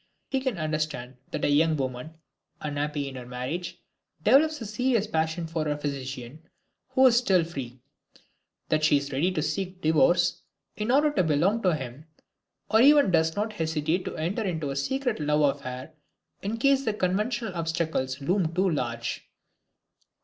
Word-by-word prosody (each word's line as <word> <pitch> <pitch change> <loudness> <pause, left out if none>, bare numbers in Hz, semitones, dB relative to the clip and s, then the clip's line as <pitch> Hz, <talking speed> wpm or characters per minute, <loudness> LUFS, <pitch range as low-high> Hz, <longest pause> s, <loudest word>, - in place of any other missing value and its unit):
We 265 - +3
can 260 -6 -2
understand 155 -5 -3
that - - -2
a - - +2
young 155 +2 +3
woman, 130 +3 -4 0.4
unhappy 145 -1 -2
in 135 - -7
her 125 -2 -8
marriage, 130 +8 -5 0.4
develops 300 - +4
a 230 - -6
serious 225 +1 +1
passion 160 -2 -1
for 160 -1 -2
her 150 -1 -1
physician, 135 -1 -5 0.5
who 265 - +4
is 240 -2 +6
still 190 -8 +3
free; 130 -7 -7 0.9
that 155 0 +1
she 150 -1 +5
is 140 0 -4
ready 150 +8 +1
to 155 -5 -1
seek 180 +4 -3
divorce 175 +2 +3 0.3
in 210 +2 -3
order 295 +4 +4
to 195 - +2
belong 170 +8 +2
to 180 -5 +2
him, 135 +2 -8 0.6
or 220 +2 +4
even 285 -5 +6
does 160 -1 +2
not 215 +1 -2
hesitate 160 0 -1
to - - -5
enter 170 +8 -1
into 160 -8 -2
a - - -4
secret 245 - -1
love 150 -1 +2
affair, 130 +4 -7 0.5
in 210 +3 -3
case 275 +3 +3
the 220 -4 -1
conventional 210 +3 -1
obstacles 160 -6 -2
loom 170 +1 0
too 190 +2 +2
large. 120 -6 -3
160 Hz, 165 wpm, -27 LUFS, 145-205 Hz, 0.9 s, is